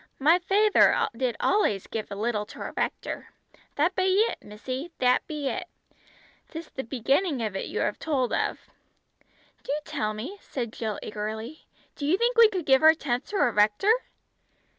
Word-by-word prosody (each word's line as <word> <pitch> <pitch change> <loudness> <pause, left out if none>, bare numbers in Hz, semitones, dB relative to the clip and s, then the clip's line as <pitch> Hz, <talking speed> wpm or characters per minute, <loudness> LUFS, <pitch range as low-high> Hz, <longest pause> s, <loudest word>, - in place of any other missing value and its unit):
"My 320 +6 +4
fayther 400 +3 +4
did 245 -1 -1
allays 220 - +1
give 220 -1 -5
a - - -5
little 210 0 -1
to - - -12
our - - -6
rector; - - -3 0.5
that 330 +6 +1
be 375 0 +2
it 465 - -3
missy, 255 +9 -6
that 250 0 +2
be 300 -3 -3
it. 365 +6 -3 0.8
'Tis 325 0 -8
the 265 - -5
beginning 270 - 0
of 210 -3 -3
it 195 - -3
you - - -3
have - - -1
told 270 -6 0
of!" - - 0 1.0
"Do - - -5
tell 215 -8 -2
me," 300 - -7
said 240 -4 -5
Jill 215 -3 -3
eagerly. 220 +7 -6 0.3
"Do 285 - -4
you 350 +5 +3
think 475 +2 +1
we 460 -2 +8
could 370 -6 -3
give 265 -1 +5
our 315 +1 +7
tenth 250 -5 -2
to 415 - -6
our 310 -11 +3
rector?" 210 - +3
270 Hz, 175 wpm, -26 LUFS, 225-355 Hz, 1.0 s, we